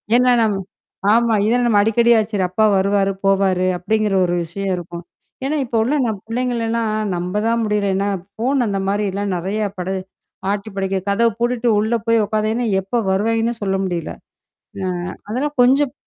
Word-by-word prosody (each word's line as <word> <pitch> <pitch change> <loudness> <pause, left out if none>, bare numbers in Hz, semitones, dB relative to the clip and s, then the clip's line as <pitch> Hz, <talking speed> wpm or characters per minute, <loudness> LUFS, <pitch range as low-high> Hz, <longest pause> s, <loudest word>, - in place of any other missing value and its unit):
ஏன்னா 250 0 +4
நம்ம 210 -3 +1 0.6
ஆமா 235 0 +3
இதெல்லாம் 245 +2 +2
நம்ம 210 -3 +4
அடிக்கடியா 235 +1 +4
சரி. 195 -3 0
அப்பா 215 +4 +2
வருவாரு 195 0 +2
போவாரு! 195 -2 +2
அப்பிடிங்கிற 215 +2 0
ஒரு 175 - -1
விஷயம் 195 +4 -4
இருக்கும். 175 -1 -7 0.4
ஏன்னா, 300 +3 0
இப்ப 235 - -5
உள்ள 275 +6 0
நம் 210 -3 -3
பிள்ளைங்கள 240 0 -1
எல்லாம் 225 -1 0 0.2
நம்ப 180 +2 -3
தான் 230 0 +1
முடியல. 210 -2 0
ஏன்னா, 200 +1 0 0.3
ஃபோன் 250 +2 +1
அந்த 195 -1 -1
மாதிரிலாம் 200 -1 -1
நிறையா 205 +5 -2
படு 185 +2 -3 0.6
ஆட்டி 205 +1 -3
படைக்க 195 0 -1
கதவு 230 +3 +3
பூட்டிட்டு 240 0 0
உள்ள 220 +3 0
போய் 230 -2 +4
உட்காதாங்கன்னா, 220 +3 -1
எப்போ 195 +6 -3
வருவாய்ங்கன்னு 225 +3 0
சொல்ல 195 -1 0
முடியல. 175 -3 -3 0.7
ஆ, 185 - -1 0.4
அதெல்லாம் 275 +7 -2
கொஞ்சம் 270 +2 +3
215 Hz, 160 wpm, -19 LUFS, 195-235 Hz, 0.7 s, ஏன்னா